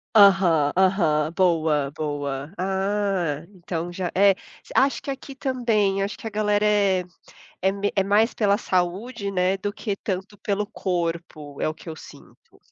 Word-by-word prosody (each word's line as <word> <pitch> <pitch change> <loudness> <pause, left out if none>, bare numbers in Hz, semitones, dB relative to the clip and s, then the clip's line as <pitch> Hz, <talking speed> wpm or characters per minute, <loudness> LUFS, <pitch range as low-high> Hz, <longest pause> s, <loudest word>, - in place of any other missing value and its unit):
Aham, 190 -8 +6
aham, 165 -5 +2
boa, 160 -6 +2
boa. 145 -2 -3
Ah, 190 -4 -1
então 175 -1 -5
já 180 -1 -3
é, 200 +1 +6 0.4
acho 275 +1 +3
que 275 - -3
aqui 275 0 -8
também, 230 -8 +1
acho 200 +1 -2
que - - -12
a - - -3
galera 210 0 +1
é 200 -3 +3 0.6
é 190 - +3
me 200 +1 -2
é 195 - +3
mais 210 +4 +3
pela 205 -2 +2
saúde, 200 +3 -1
né, 185 0 +1
do 205 +1 -3
que 205 -1 -3
tanto 195 +1 -4
pelo 205 -1 -1
corpo, 170 -7 -4
é - - +1
o - - -4
que - - -16
eu 160 - -6
sinto. - - -16
190 Hz, 160 wpm, -24 LUFS, 170-205 Hz, 0.6 s, Aham